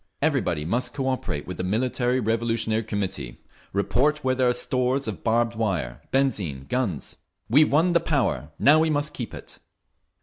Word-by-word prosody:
Everybody 125 Hz, -, 0 dB
must 125 Hz, -, -1 dB
cooperate 130 Hz, -, -2 dB
with 90 Hz, -1 st, -6 dB
the -, -, -3 dB
Military 125 Hz, +5 st, 0 dB
Revolutionary 115 Hz, -1 st, 0 dB
Committee, 100 Hz, -, -4 dB, 0.3 s
report 140 Hz, +9 st, +1 dB
where 130 Hz, 0 st, +2 dB
there 130 Hz, -1 st, +2 dB
are -, -, +2 dB
stores 125 Hz, +2 st, 0 dB
of 95 Hz, -7 st, -5 dB
barbed 115 Hz, +1 st, +1 dB
wire, 90 Hz, -, -2 dB
benzine, 100 Hz, -, 0 dB
guns…. 110 Hz, -, -2 dB, 0.3 s
We've 150 Hz, +6 st, +5 dB
won 165 Hz, +5 st, +4 dB
the 170 Hz, -, +5 dB
power; 145 Hz, -, 0 dB
now 150 Hz, +2 st, +6 dB
we 160 Hz, 0 st, +2 dB
must 145 Hz, 0 st, 0 dB
keep 120 Hz, -, -5 dB
it!" -, -, -10 dB
120 Hz, 160 wpm, -25 LUFS, 100-135 Hz, 0.3 s, now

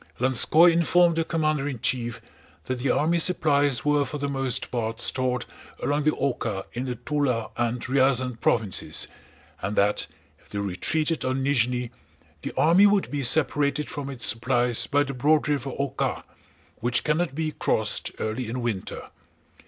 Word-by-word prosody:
Lanskóy 130 Hz, +7 st, +5 dB
informed 170 Hz, +1 st, +3 dB
the 165 Hz, -, +2 dB
commander 155 Hz, -3 st, 0 dB
in 135 Hz, -5 st, -4 dB
chief 120 Hz, -1 st, -2 dB, 0.4 s
that 130 Hz, -1 st, -3 dB
the 135 Hz, -, -1 dB
army 170 Hz, +3 st, +2 dB
supplies 145 Hz, -7 st, +2 dB
were 145 Hz, -1 st, +3 dB
for 140 Hz, +2 st, -5 dB
the 140 Hz, 0 st, -2 dB
most 135 Hz, -3 st, -2 dB
part 115 Hz, -2 st, -3 dB
stored 125 Hz, 0 st, 0 dB, 0.4 s
along 145 Hz, +1 st, 0 dB
the -, -, +5 dB
Oká 115 Hz, -7 st, -2 dB
in 125 Hz, +2 st, -3 dB
the 125 Hz, -1 st, -3 dB
Túla 130 Hz, -4 st, -1 dB
and 120 Hz, 0 st, -1 dB
Ryazán 130 Hz, -2 st, +1 dB
provinces, 110 Hz, -5 st, +1 dB, 0.5 s
and 100 Hz, +2 st, -3 dB
that 105 Hz, +1 st, +1 dB, 0.3 s
if -, -, -26 dB
they 105 Hz, -, -6 dB
retreated 150 Hz, -, -1 dB
on 130 Hz, +1 st, -1 dB
Nízhni 125 Hz, -3 st, +1 dB, 0.5 s
the -, -, -5 dB
army 175 Hz, +6 st, +6 dB
would 205 Hz, -1 st, +1 dB
be 145 Hz, -1 st, -2 dB
separated 145 Hz, +2 st, +2 dB
from 140 Hz, -1 st, -5 dB
its 130 Hz, -4 st, -3 dB
supplies 120 Hz, 0 st, +1 dB
by 145 Hz, 0 st, +2 dB
the 140 Hz, -1 st, -5 dB
broad 150 Hz, +4 st, +2 dB
river 140 Hz, -3 st, -1 dB
Oká, 140 Hz, -1 st, -2 dB, 0.5 s
which 120 Hz, +1 st, 0 dB
cannot 150 Hz, -1 st, 0 dB
be 155 Hz, 0 st, -1 dB
crossed -, -, -1 dB
early 110 Hz, +2 st, -3 dB
in 125 Hz, +2 st, -3 dB
winter. 115 Hz, -6 st, -4 dB
135 Hz, 160 wpm, -25 LUFS, 120-150 Hz, 0.5 s, army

